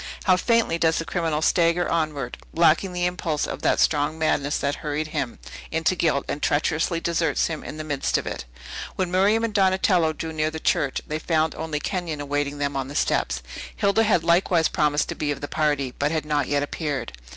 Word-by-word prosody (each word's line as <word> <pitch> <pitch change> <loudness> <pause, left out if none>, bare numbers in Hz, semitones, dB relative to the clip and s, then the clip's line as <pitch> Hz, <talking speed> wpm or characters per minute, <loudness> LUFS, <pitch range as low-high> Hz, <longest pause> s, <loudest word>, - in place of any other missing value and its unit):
How 185 - +5
faintly 225 -3 +2
does 160 -1 +3
the 165 - -2
criminal 160 -3 -1
stagger 170 +1 +3
onward, 150 -6 -2 0.2
lacking 170 +3 +4
the 180 0 -1
impulse 170 -4 -1
of - - -5
that - - +2
strong 150 +1 +2
madness 145 -2 +1
that 140 +1 -1
hurried 150 +1 -3
him 130 -5 -3 0.3
into 165 +3 +1
guilt, 155 -5 +1
and 145 - -3
treacherously 160 +3 +1
deserts 170 -1 +1
him 160 -2 -4
in 155 - -7
the 155 - -4
midst 145 -3 0
of - - -4
it! - - -5 0.5
When 185 -2 -1
Miriam 200 +5 +3
and 230 -2 -1
Donatello 190 -4 +3
drew 160 +1 -5
near 155 0 0
the 160 0 -6
church, 145 -3 0
they 155 +1 -3
found 160 -1 +1
only 160 -2 -3
Kenyon 175 -4 -3
awaiting 145 0 -2
them 145 -1 -2
on 135 -1 -2
the 140 - -8
steps. - - 0 0.3
Hilda 200 +2 +2
had 205 -7 +3
likewise 170 -1 +3
promised 150 -1 +1
to - - -1
be 150 - -3
of 145 - -2
the 145 - -5
party, 145 -5 0
but 145 - +2
had 160 -2 -1
not 145 -3 0
yet 145 0 +1
appeared. 145 - -3
155 Hz, 205 wpm, -24 LUFS, 145-170 Hz, 0.5 s, How